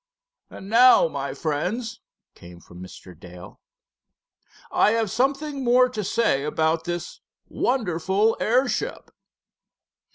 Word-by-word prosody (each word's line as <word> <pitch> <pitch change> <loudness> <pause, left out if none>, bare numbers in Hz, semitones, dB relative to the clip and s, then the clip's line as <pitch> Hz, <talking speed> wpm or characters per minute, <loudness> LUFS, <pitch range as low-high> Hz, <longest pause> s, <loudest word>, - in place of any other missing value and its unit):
"And 190 - -11
now, 250 - +6
my - - -5
friends," 185 +10 -3 0.3
came 85 0 -14
from 90 +1 -15
Mr. 95 0 -12
Dale. 90 +3 -13 1.1
"I 210 - +3
have 225 -3 -1
something 275 +4 -1
more 250 +1 +4
to 215 -4 -5
say 195 -8 0
about 160 +2 -1
this 175 0 -5 0.3
wonderful 205 -2 0
airship." 250 +3 -1
210 Hz, 105 wpm, -23 LUFS, 160-245 Hz, 1.1 s, now